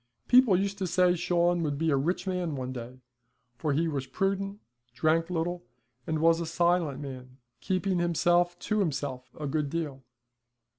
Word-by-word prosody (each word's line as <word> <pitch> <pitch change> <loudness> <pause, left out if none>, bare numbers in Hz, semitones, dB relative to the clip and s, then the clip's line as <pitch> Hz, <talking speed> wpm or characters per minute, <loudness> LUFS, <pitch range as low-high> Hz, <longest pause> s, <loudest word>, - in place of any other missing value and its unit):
People 245 -7 +6
used 200 +1 -2
to 190 - -1
say 180 +1 +3
Shawn 175 0 +1
would 145 -3 -1
be 160 +1 +1
a - - +4
rich 170 +7 -1
man 180 -5 -2
one 130 -1 -4
day, 125 +1 -8 0.5
for 150 +4 -1
he 160 +4 +1
was 140 -4 -3
prudent, 195 +7 -1 0.4
drank 165 +2 +2
little, 175 0 -2 0.4
and 160 - 0
was 165 +1 +4
a 165 - -3
silent 170 -4 +1
man, 130 -2 -8 0.2
keeping 185 -1 0
himself 175 +1 +2
to 215 0 0
himself 140 -7 -2
a 150 - -3
good 145 0 -1
deal. 150 -4 -3
165 Hz, 165 wpm, -28 LUFS, 145-180 Hz, 0.5 s, People